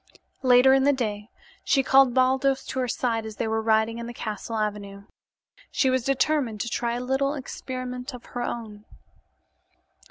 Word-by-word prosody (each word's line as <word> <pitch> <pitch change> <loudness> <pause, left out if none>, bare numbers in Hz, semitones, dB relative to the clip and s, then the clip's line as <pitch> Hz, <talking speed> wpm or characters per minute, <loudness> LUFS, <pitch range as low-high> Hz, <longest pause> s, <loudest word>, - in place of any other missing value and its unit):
Later 255 0 +6
in 270 0 +4
the 285 +1 +4
day 215 -4 -3 0.3
she 270 -2 +2
called 265 -2 +5
Baldos 265 +1 +2
to 260 - -4
her 255 - 0
side 230 -1 -1
as 220 -1 -8
they 220 - -2
were 220 0 0
riding 220 +1 +1
in 235 - -6
the 240 - -8
castle 215 +1 -5
avenue. 205 -2 -4 0.7
She 265 - +1
was 255 -2 +1
determined 270 -3 0
to 235 - -3
try 235 +1 -1
a - - -3
little 270 +3 0
experiment 255 -1 -6
of 245 - -12
her 245 - -3
own. 215 -3 -5
245 Hz, 170 wpm, -25 LUFS, 220-265 Hz, 0.7 s, Later